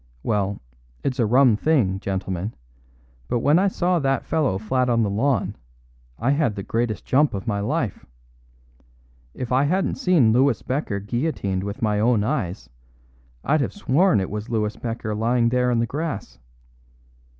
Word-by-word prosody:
Well, 100 Hz, -2 st, -1 dB, 0.4 s
it's 135 Hz, -1 st, -2 dB
a 115 Hz, -, +3 dB
rum 125 Hz, 0 st, +5 dB
thing, 110 Hz, -8 st, +1 dB
gentlemen, 95 Hz, +1 st, -3 dB, 0.7 s
but 120 Hz, -, 0 dB
when 145 Hz, +6 st, +4 dB
I 195 Hz, -, +3 dB
saw 180 Hz, -2 st, +1 dB
that 135 Hz, -2 st, 0 dB
fellow 150 Hz, -12 st, 0 dB
flat 125 Hz, +5 st, 0 dB
on 115 Hz, -1 st, +3 dB
the 100 Hz, -, 0 dB
lawn 120 Hz, +2 st, 0 dB, 0.6 s
I 130 Hz, -, +1 dB
had 140 Hz, -7 st, +1 dB
the 100 Hz, -, -5 dB
greatest 115 Hz, 0 st, -2 dB
jump 145 Hz, -2 st, +2 dB
of 95 Hz, -, -5 dB
my 105 Hz, -3 st, -1 dB
life. 100 Hz, -, -2 dB, 1.3 s
If 125 Hz, -, -5 dB
I 130 Hz, +3 st, +3 dB
hadn't 185 Hz, -, 0 dB
seen 165 Hz, -, +4 dB
Louis 135 Hz, +4 st, +3 dB
Becker 125 Hz, -6 st, -2 dB
guillotined 100 Hz, -4 st, -2 dB
with 100 Hz, +3 st, -5 dB
my 105 Hz, -1 st, +1 dB
own 110 Hz, -1 st, +3 dB
eyes, 95 Hz, -, -2 dB, 0.8 s
I'd 155 Hz, +1 st, +2 dB
have -, -, -2 dB
sworn 180 Hz, -, +2 dB
it 95 Hz, -, -3 dB
was 105 Hz, +2 st, -5 dB
Louis 110 Hz, -2 st, -1 dB
Becker 115 Hz, -2 st, -4 dB
lying 115 Hz, +2 st, +2 dB
there 125 Hz, 0 st, +1 dB
in 120 Hz, -, +1 dB
the 115 Hz, -, +2 dB
grass. 140 Hz, -, -5 dB
120 Hz, 160 wpm, -23 LUFS, 105-140 Hz, 1.3 s, rum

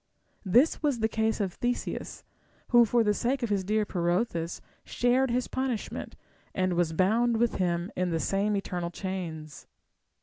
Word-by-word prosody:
This 240 Hz, -, +3 dB
was 290 Hz, -5 st, +1 dB
the 220 Hz, -1 st, +1 dB
case 220 Hz, 0 st, 0 dB
of 195 Hz, -4 st, -1 dB
Theseus, 245 Hz, 0 st, -3 dB, 0.5 s
who 240 Hz, -1 st, +7 dB
for 235 Hz, +2 st, +2 dB
the 210 Hz, -1 st, +2 dB
sake 250 Hz, +4 st, -1 dB
of 230 Hz, -, -1 dB
his 195 Hz, -2 st, +1 dB
dear 210 Hz, +2 st, +1 dB
Pirithous 175 Hz, -1 st, -1 dB, 0.2 s
shared 250 Hz, +2 st, +1 dB
his 245 Hz, +1 st, 0 dB
punishment, 260 Hz, -4 st, -3 dB, 0.4 s
and 185 Hz, -1 st, +1 dB
was 175 Hz, -2 st, +1 dB
bound 225 Hz, +7 st, +2 dB
with 235 Hz, 0 st, +1 dB
him 175 Hz, 0 st, -1 dB
in 180 Hz, 0 st, 0 dB
the 165 Hz, -1 st, 0 dB
same 200 Hz, +4 st, 0 dB
eternal 175 Hz, -3 st, -3 dB
chains. 170 Hz, -5 st, -6 dB
210 Hz, 160 wpm, -28 LUFS, 180-240 Hz, 0.5 s, who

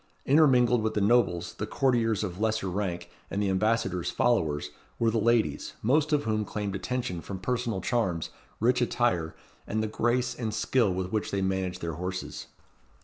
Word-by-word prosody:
Intermingled 125 Hz, -5 st, +5 dB
with 110 Hz, 0 st, -1 dB
the -, -, +2 dB
nobles, 100 Hz, -6 st, +2 dB
the 105 Hz, -, -5 dB
courtiers 115 Hz, -5 st, +1 dB
of 90 Hz, -2 st, -4 dB
lesser 110 Hz, -2 st, 0 dB
rank, 90 Hz, -1 st, -3 dB, 0.2 s
and 100 Hz, -, -2 dB
the 100 Hz, -2 st, +1 dB
ambassadors' 95 Hz, -3 st, +1 dB
followers, 75 Hz, -13 st, +1 dB, 0.3 s
were 115 Hz, -1 st, +2 dB
the 115 Hz, -, +1 dB
ladies, 115 Hz, 0 st, +1 dB
most 145 Hz, +7 st, +2 dB
of 145 Hz, -1 st, +2 dB
whom 110 Hz, -1 st, 0 dB
claimed 105 Hz, -1 st, -4 dB
attention 95 Hz, -4 st, -3 dB
from 95 Hz, -, -6 dB
personal 115 Hz, -1 st, -2 dB
charms, 95 Hz, -8 st, -1 dB, 0.3 s
rich 125 Hz, +3 st, +3 dB
attire, 115 Hz, -10 st, 0 dB, 0.3 s
and 110 Hz, +1 st, -1 dB
the -, -, 0 dB
grace 120 Hz, +3 st, 0 dB
and 115 Hz, -3 st, -3 dB
skill 120 Hz, -7 st, +2 dB
with 90 Hz, 0 st, -3 dB
which 110 Hz, -1 st, -1 dB
they 100 Hz, -1 st, -1 dB
managed 95 Hz, -1 st, -1 dB
their 85 Hz, -1 st, -3 dB
horses. 90 Hz, +3 st, -5 dB
110 Hz, 170 wpm, -28 LUFS, 95-120 Hz, 0.3 s, Intermingled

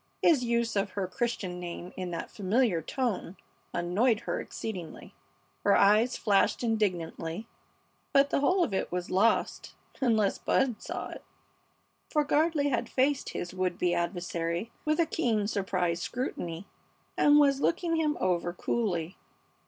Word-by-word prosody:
His 305 Hz, -7 st, +5 dB
use 235 Hz, -1 st, 0 dB
of 200 Hz, -1 st, 0 dB
her 200 Hz, -2 st, -1 dB
Christian 195 Hz, -4 st, -3 dB
name 175 Hz, 0 st, -7 dB
in 185 Hz, -1 st, -4 dB
that 170 Hz, -, -5 dB
familiar 205 Hz, -2 st, +1 dB
tone 210 Hz, -, -3 dB, 0.3 s
annoyed 210 Hz, +7 st, +1 dB
her -, -, -2 dB
exceedingly. 180 Hz, -8 st, -7 dB, 0.5 s
Her 200 Hz, -, +5 dB
eyes 215 Hz, +5 st, +4 dB
flashed 205 Hz, +3 st, +2 dB
indignantly, 195 Hz, -3 st, -1 dB, 0.6 s
but 280 Hz, 0 st, +4 dB
the -, -, +2 dB
whole 360 Hz, +6 st, +3 dB
of 210 Hz, -, -2 dB
it 190 Hz, -, -1 dB
was 180 Hz, 0 st, -3 dB
lost 205 Hz, +5 st, +1 dB, 0.3 s
unless 220 Hz, -6 st, +2 dB
Bud 255 Hz, -5 st, +1 dB
saw -, -, -5 dB
it, -, -, -9 dB, 0.9 s
for 300 Hz, -2 st, +2 dB
Gardley 295 Hz, 0 st, +2 dB
had 240 Hz, -2 st, -1 dB
faced 275 Hz, +2 st, +1 dB
his 175 Hz, -, -4 dB
would 185 Hz, -1 st, -1 dB
be 175 Hz, -1 st, +1 dB
adversary 175 Hz, +2 st, -2 dB
with 305 Hz, +1 st, +1 dB
a 335 Hz, -, +5 dB
keen, 235 Hz, -10 st, 0 dB
surprised 180 Hz, -4 st, -1 dB
scrutiny, 175 Hz, -8 st, -4 dB, 0.5 s
and 290 Hz, 0 st, +5 dB
was 280 Hz, -2 st, +4 dB
looking 335 Hz, -1 st, +1 dB
him 305 Hz, -2 st, +1 dB
over 175 Hz, -1 st, 0 dB
coolly. 180 Hz, -4 st, -2 dB
210 Hz, 145 wpm, -29 LUFS, 180-255 Hz, 0.9 s, His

